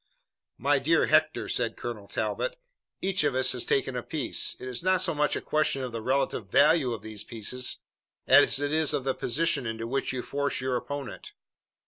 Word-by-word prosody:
"My - - +2
dear - - +3
Hector," - - +2
said - - -1
Colonel - - -6
Talbot, - - -2 0.5
"each 190 -2 +2
of 145 -3 +1
us 130 0 +4
has 125 - -1
taken 135 -1 0
a 125 - -2
piece. 150 +2 -1
It 130 - -7
is 125 -1 -3
not 185 +1 +2
so - - +2
much 150 0 +1
a - - -3
question 150 -3 0
of 125 - -4
the 115 -1 -5
relative 130 -5 -1
value 145 +2 +4
of 110 -3 -5
these 110 -1 -5
pieces 120 +3 -3 0.4
as - - +6
it 145 +1 -1
is 155 -2 +2
of 135 - -2
the 135 0 0
position 140 -1 0
into 115 0 -4
which 135 +4 -1
you 130 -1 -4
force 140 0 -2
your 130 0 -1
opponent." 140 +1 -6
135 Hz, 195 wpm, -27 LUFS, 125-150 Hz, 0.5 s, as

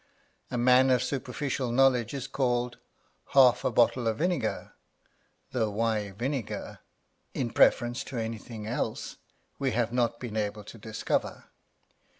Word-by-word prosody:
A 125 - -3
man 125 +2 +5
of 125 -1 +3
superficial 130 -1 -2
knowledge 125 -1 +3
is 135 -2 -4
called 125 -3 -1 0.6
half 130 -3 +6
a - - +2
bottle 120 0 +3
of 110 -1 0
vinegar, 175 +2 -1 0.8
though 115 -4 0
why 105 -1 -1
vinegar, 120 +5 -4 0.6
in 120 -3 -1
preference 120 +1 +3
to 130 - -6
anything 110 -1 -5
else, 115 +3 -3 0.4
we 135 -2 0
have 120 0 0
not 120 -1 +1
been 115 -3 -5
able 105 0 -2
to 110 +3 -12
discover. 110 +1 -3
120 Hz, 135 wpm, -28 LUFS, 115-130 Hz, 0.8 s, half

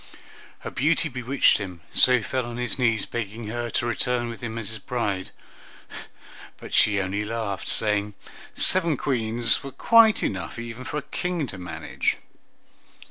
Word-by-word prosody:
Her - - -6
beauty 155 +3 +1
bewitched 130 +1 +2
him, 90 -4 -7
so 125 -1 +6
he 115 - -4
fell 130 +1 -2
on 120 0 -7
his 125 +1 -2
knees, 115 -4 +1
begging 110 -1 -5
her 120 +1 -3
to 115 - -1
return 120 +1 -1
with 115 - -8
him 115 -1 -5
as 110 -3 -5
his 110 -1 -8
bride; 100 -5 -3 1.3
but - - -11
she 105 -2 +4
only 100 +2 -2
laughed, 110 -3 -4
saying 105 -1 +1 0.4
seven 170 -6 +5
Queens 115 -3 +1
were 140 - -6
quite 225 - +5
enough 95 - -3
even 115 +2 -7
for 150 - -4
a 150 - -3
King 175 -4 -3
to 95 -7 -8
manage. 90 - -3
115 Hz, 160 wpm, -24 LUFS, 105-130 Hz, 1.3 s, so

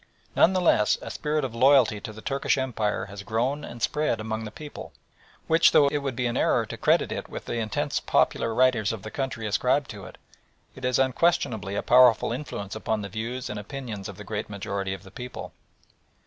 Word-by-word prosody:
None 185 - +5
the 185 - +1
less 105 - +3
a - - -6
spirit 150 -1 -1
of 125 - -5
loyalty 130 -3 +4
to 110 - -6
the 110 0 -12
Turkish 140 +1 0
Empire 110 -7 -1
has 100 0 -9
grown 120 +7 -1
and 120 -2 -8
spread 150 -6 0
among 110 0 -4
the - - -5
people, 150 +6 -9 0.5
which, 165 +1 +4
though 140 -1 +6
it 145 - -1
would 135 -3 -3
be 125 0 -1
an 120 - -1
error - - +2
to - - -7
credit - - +2
it - - -5
with - - -7
the 120 - -3
intensity 110 -2 -2
popular 115 - +2
writers 120 -3 +3
of 110 -4 -6
the 110 - -7
country 135 -5 -3
ascribe 125 +6 +1
to 100 -3 -8
it, - - -12 0.7
has 125 -1 +2
unquestionably 130 - +1
a - - -1
powerful 125 -3 +5
influence 120 -7 -5
upon 110 -1 -2
the 100 - -5
views 115 +5 -4
and 105 - -5
opinions 110 -3 -6
of 100 - -9
the 105 - -8
great 105 +1 -4
majority 100 -1 -3
of 95 - -13
the 95 - -14
people. 125 +4 -8
115 Hz, 205 wpm, -26 LUFS, 105-135 Hz, 0.7 s, though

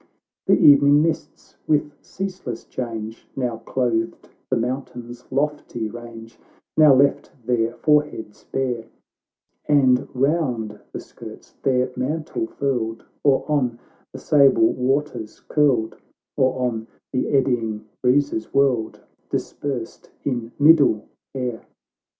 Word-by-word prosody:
The - - +5
evening 145 +1 +6
mists, 165 0 -4
with 150 -1 +2
ceaseless 185 -11 -6
change, 115 -3 -6
Now 125 -4 -2
clothed 115 -1 -2 0.2
the 130 - +2
mountains' 120 0 -5
lofty 140 -5 -2
range, 115 0 -10 0.4
Now 150 -3 +7
left 140 +2 +2 0.2
their 115 -1 +1
foreheads 150 -8 0
bare, 125 -4 -2 0.8
And 130 -4 +4
round 130 -6 0
the - - -5
skirts - - -12
their 130 -1 +1
mantle 155 - -2
furled, 125 - -2 0.2
Or 140 -2 +3
on 130 -6 0 0.3
the - - -8
sable 135 -5 +4
waters 130 -3 -2
curled, 130 -7 +2 0.4
Or, 130 -2 +1
on 110 -2 -4 0.3
the 130 - 0
eddying 115 -6 0 0.2
breezes 125 -3 +1
whirled, 135 -5 +1 0.3
Dispersed 130 -6 -4 0.2
in 120 -4 -2
middle 145 -8 +5 0.3
air. 125 -3 -3
130 Hz, 110 wpm, -22 LUFS, 115-145 Hz, 0.8 s, Now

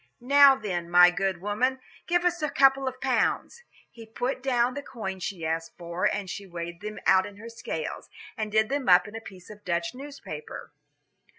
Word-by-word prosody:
"Now, 280 +2 +7
then, 180 -8 -4
my 180 0 +7
good 190 0 -2
woman, 250 +7 0 0.3
give 350 +1 +1
us 350 -1 +1
a 300 - 0
couple 270 -1 +4
of 255 0 -4
pounds." 265 - 0 0.3
He 230 -1 -13
put 250 +4 -3
down 250 -2 +1
the 285 - -5
coin 205 -9 -6
she 185 -3 -5
asked 165 +1 -3
for, 170 +1 -3
and 200 -2 0
she 195 +3 -7
weighed 170 0 -7
them 210 +1 -6
out 190 0 +4
in 205 -1 -13
her 225 +3 -9
scales, 165 -8 -6 0.3
and 215 -1 -4
did 220 +1 +2
them 275 -4 -1
up 180 +1 +6
in 210 - -10
a 225 - -6
piece 190 -3 -12
of 210 - -12
a - - -41
Dutch 170 -1 -2
newspaper. 285 - -9
215 Hz, 200 wpm, -27 LUFS, 180-265 Hz, 0.3 s, Now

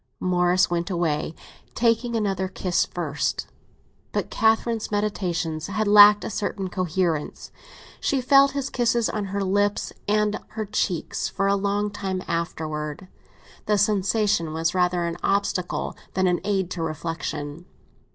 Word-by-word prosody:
Morris 180 0 +2
went 175 +1 -2
away, 165 -3 -1 0.4
taking 235 0 +1
another 195 -4 0
kiss 185 -1 0
first. 150 -5 -2 0.7
But - - -2
Catherine's 225 0 +1
meditations 175 -6 -2
had 210 +2 -1
lacked 205 0 +8
a - - -4
certain 195 -2 -3
coherence. 175 -4 -2 0.5
She 275 - 0
felt 275 +1 +5
his 275 -1 -3
kisses 235 -2 +1
on 210 -2 -2
her 200 +1 -2
lips 205 +2 0
and 210 0 +2
on - - -17
her 215 - -1
cheeks 195 -4 -1
for 195 - -2
a 200 0 +3
long 205 +1 0
time 190 -2 -3
afterwards; 155 -2 -3 0.6
the 210 -1 +3
sensation 200 -5 +1
was 165 +1 0
rather 180 -1 +1
an 170 0 -3
obstacle 195 -2 -1 0.2
than 185 0 +2
an 180 -1 +1
aid 190 -3 -1
to 170 - -4
reflexion. 160 0 -4
190 Hz, 140 wpm, -24 LUFS, 170-210 Hz, 0.7 s, lacked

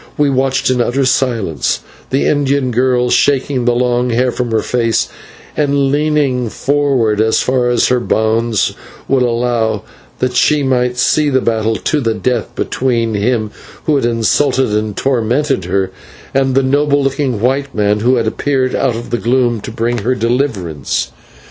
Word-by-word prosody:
We 145 -1 +2
watched 135 0 +1
in 125 -1 +1
utter 130 +3 0
silence, 115 - 0 0.3
the 135 - 0
Indian 140 -3 +1
girl 125 0 +1
shaking 135 -2 +1
the 120 -1 +2
long 125 0 +1
hair 125 +2 +1
from 125 -1 -3
her 110 -1 0
face, 115 -2 0 0.5
and 140 -2 +1
leaning 145 -5 +1
forward 135 -6 +1
as 110 0 +2
far 125 -1 +1
as 120 - +2
her 125 0 +2
bonds 110 -1 0 0.3
would 135 -1 +2
allow, 115 -3 0 0.3
that 125 -1 -1
she 150 +2 +3
might 125 -2 0
see 150 +4 +2
this 130 -2 +1
battle 110 -1 0
to 150 +5 -1
the 115 -3 0
death 115 +1 -2
between 115 -3 -1
him 110 +1 0 0.3
who 155 - +1
had 135 - +1
insulted 125 +2 +1
and 105 -1 -2
tormented 130 - 0
her, 95 +1 -1 0.4
and 135 -1 +1
the 135 - +3
noble 145 +1 +2
looking 135 -4 -1
white 135 +4 -1
man 105 0 +1
who 125 +4 +2
had 115 -2 0
appeared 130 +3 -1
out 130 -4 0
of 120 +1 -7
the 120 - 0
gloom 120 -2 +1
to - - -7
bring 120 +1 -1
her 125 +5 0
deliverance. 115 - -1
125 Hz, 165 wpm, -15 LUFS, 115-135 Hz, 0.5 s, she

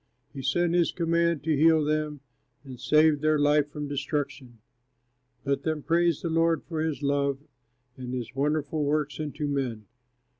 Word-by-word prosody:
He 135 - -6
sent 170 +6 +1
his 175 -1 +2
command 170 -2 0
to 155 0 +1
heal 160 +1 +4
them, 150 -1 -1 0.4
And 130 -3 -10
saved 150 +2 +3
their 155 0 +3
life 145 0 +3
from 150 0 -5
destruction. 140 -3 -4 0.9
Let 140 0 0
them 155 -1 -2
praise 170 -1 +1
the 170 - -1
Lord 165 0 +2
for 160 -2 -4
his 155 -2 -2
love, 140 -1 +1 0.6
And 125 -1 -6
his 125 -3 -5
wonderful 150 +2 -1
works 145 0 -1
unto 150 0 -4
men! 130 -7 -2
150 Hz, 155 wpm, -27 LUFS, 140-160 Hz, 0.9 s, heal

